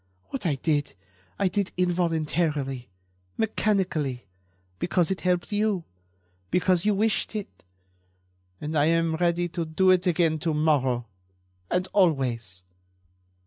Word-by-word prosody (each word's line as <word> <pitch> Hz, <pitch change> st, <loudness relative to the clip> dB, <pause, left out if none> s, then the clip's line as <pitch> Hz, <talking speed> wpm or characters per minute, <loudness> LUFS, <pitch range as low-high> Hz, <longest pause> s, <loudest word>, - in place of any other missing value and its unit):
What 265 Hz, -9 st, -3 dB
I 150 Hz, -, +1 dB
did 145 Hz, -1 st, -1 dB, 0.4 s
I 195 Hz, -, +2 dB
did 200 Hz, 0 st, -1 dB
involuntarily, 160 Hz, -, 0 dB, 0.5 s
mechanically, 185 Hz, -, 0 dB, 0.5 s
because 175 Hz, -, +1 dB
it 190 Hz, -, -2 dB
helped 180 Hz, +2 st, 0 dB
you, 205 Hz, -3 st, +1 dB, 0.7 s
because 180 Hz, 0 st, +2 dB
you 210 Hz, -1 st, +3 dB
wished 215 Hz, +1 st, 0 dB
it... 195 Hz, -, -6 dB, 1.0 s
and 150 Hz, +1 st, -4 dB
I 145 Hz, -1 st, +4 dB
am 165 Hz, 0 st, +2 dB
ready 175 Hz, 0 st, +1 dB
to 170 Hz, 0 st, -3 dB
do 175 Hz, +4 st, +3 dB
it 185 Hz, 0 st, +3 dB
again 165 Hz, -2 st, +2 dB
to 160 Hz, 0 st, -1 dB
morrow... 135 Hz, -6 st, +2 dB, 0.6 s
and 180 Hz, +1 st, 0 dB
always." 125 Hz, -, +1 dB
170 Hz, 120 wpm, -26 LUFS, 150-185 Hz, 1.0 s, I